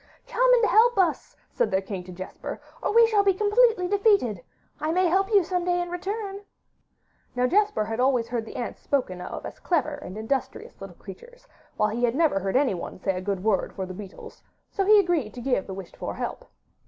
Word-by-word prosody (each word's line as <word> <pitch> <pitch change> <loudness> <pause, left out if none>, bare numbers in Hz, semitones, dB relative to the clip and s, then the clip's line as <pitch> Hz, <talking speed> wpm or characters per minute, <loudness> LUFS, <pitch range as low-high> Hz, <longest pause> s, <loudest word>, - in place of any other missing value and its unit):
'Come - - +2
and 470 -2 +3
help 465 +2 +4
us,' 360 -5 0 0.2
said 220 - 0
their 190 -2 +1
king 195 -1 -6
to 185 - -10
Jesper, 185 +1 -7 0.2
'or - - 0
we 465 +2 +7
shall 430 -3 +3
be 390 -2 +3
completely 425 -1 +3
defeated. 395 - +2 0.4
I 310 +1 -1
may 365 +2 +2
help 385 +3 +2
you 400 -3 +5
some 360 +1 -2
day 355 0 +1
in 350 0 -3
return.' 395 +2 -4 0.9
Now 250 0 +2
Jesper 405 - +2
had 225 +2 -4
always 250 -3 +2
heard 235 -2 -2
the - - -10
ants 240 - -5
spoken 185 -11 -1
of - - -7
as - - -8
clever 310 -4 0
and 285 -9 -8
industrious 240 +5 -4
little - - -9
creatures, - - -13 0.3
while 210 - +2
he 230 +3 -3
never 280 -4 +2
heard 195 +2 -3
anyone 255 -10 0
say 190 0 -1
a 185 - -4
good 195 -1 -3
word 210 -3 0
for 190 - -3
the 185 - -8
beetles, 195 0 -11 0.3
so 390 - -1
he 420 +1 +7
agreed 345 - 0
to - - -7
give 245 -5 -1
the 190 - -6
wished 190 -2 -9
for - - -5
help. - - -5
305 Hz, 210 wpm, -25 LUFS, -, 0.9 s, we